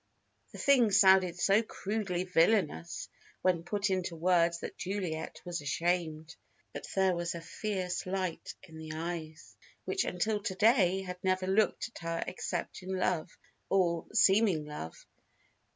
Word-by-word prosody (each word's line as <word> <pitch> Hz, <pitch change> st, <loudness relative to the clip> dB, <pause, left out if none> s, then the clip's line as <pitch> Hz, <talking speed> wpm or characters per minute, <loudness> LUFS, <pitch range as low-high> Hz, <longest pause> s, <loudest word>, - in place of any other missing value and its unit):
The -, -, -10 dB
thing 260 Hz, -5 st, +4 dB
sounded 190 Hz, -3 st, +5 dB
so 200 Hz, +4 st, +4 dB
crudely 200 Hz, -4 st, -3 dB
villainous 170 Hz, -, +1 dB, 0.4 s
when 180 Hz, -3 st, +2 dB
put 200 Hz, +3 st, -1 dB
into 185 Hz, -2 st, -1 dB
words 170 Hz, 0 st, +2 dB
that -, -, -6 dB
Juliet 180 Hz, -5 st, -4 dB
was 175 Hz, -3 st, -3 dB
ashamed. 160 Hz, +1 st, -1 dB, 0.4 s
But -, -, -7 dB
there 190 Hz, -1 st, +3 dB
was 175 Hz, 0 st, -2 dB
a 170 Hz, -, -6 dB
fierce 185 Hz, 0 st, -3 dB
light 185 Hz, -2 st, -3 dB
in 160 Hz, 0 st, -12 dB
the 155 Hz, 0 st, -7 dB
eyes 160 Hz, -1 st, -6 dB, 0.3 s
which 390 Hz, -, 0 dB
until 210 Hz, +4 st, -1 dB
to 190 Hz, -2 st, -3 dB
day 195 Hz, -3 st, +4 dB
had 180 Hz, -1 st, -7 dB
never 185 Hz, 0 st, +1 dB
looked 205 Hz, +5 st, +1 dB
at -, -, -8 dB
her 165 Hz, 0 st, -2 dB
except 185 Hz, -, -4 dB
in 190 Hz, +1 st, -4 dB
love 180 Hz, -3 st, 0 dB, 0.4 s
or 170 Hz, -4 st, +1 dB
seeming 200 Hz, -6 st, +4 dB
love. 150 Hz, -, -8 dB
180 Hz, 145 wpm, -31 LUFS, 170-195 Hz, 0.4 s, sounded